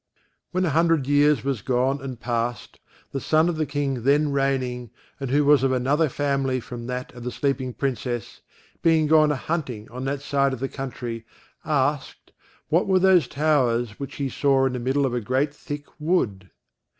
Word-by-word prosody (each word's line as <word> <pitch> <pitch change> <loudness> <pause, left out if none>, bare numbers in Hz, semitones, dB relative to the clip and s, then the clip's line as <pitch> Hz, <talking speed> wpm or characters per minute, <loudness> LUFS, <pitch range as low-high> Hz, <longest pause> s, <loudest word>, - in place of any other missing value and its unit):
When 185 +1 0
a 165 - 0
hundred 165 -2 +2
years 145 -2 +3
were 140 - +1
gone 130 +2 +1
and 130 -3 -6
past, 120 0 -3 0.3
the 135 - -2
son 160 +1 +3
of 175 - -1
the 155 -1 -1
King 140 -3 -2
then 145 +4 +3
reigning, 130 -3 -1 0.3
and 135 -2 -4
who 145 +2 +3
was 145 -1 +5
of 135 -1 +2
another 140 +5 +2
family 135 -2 0
from 120 0 -8
that 125 0 -5
of 120 -1 -10
the 125 - -2
sleeping 130 -1 -1
Princess, 125 -3 -3 0.4
being 160 -2 +4
gone 155 0 +5
a - - 0
hunting 130 -7 -4
on 125 +2 -5
that 140 +1 -3
side 140 -1 +1
of 130 - -5
the 135 - -1
country, 120 -4 -5 0.4
asked, 145 -2 -1 0.4
what 170 +5 +2
were 190 -1 +4
those 185 -6 +4
towers 125 -7 +1
which 140 -2 -6
he 140 - -2
saw 135 0 +2
in 130 - 0
the 125 - -3
middle 135 +3 +1
of 130 - -1
a 120 - -1
great 130 +6 0
thick 145 0 -7
wood? 110 - 0
135 Hz, 185 wpm, -24 LUFS, 125-150 Hz, 0.4 s, was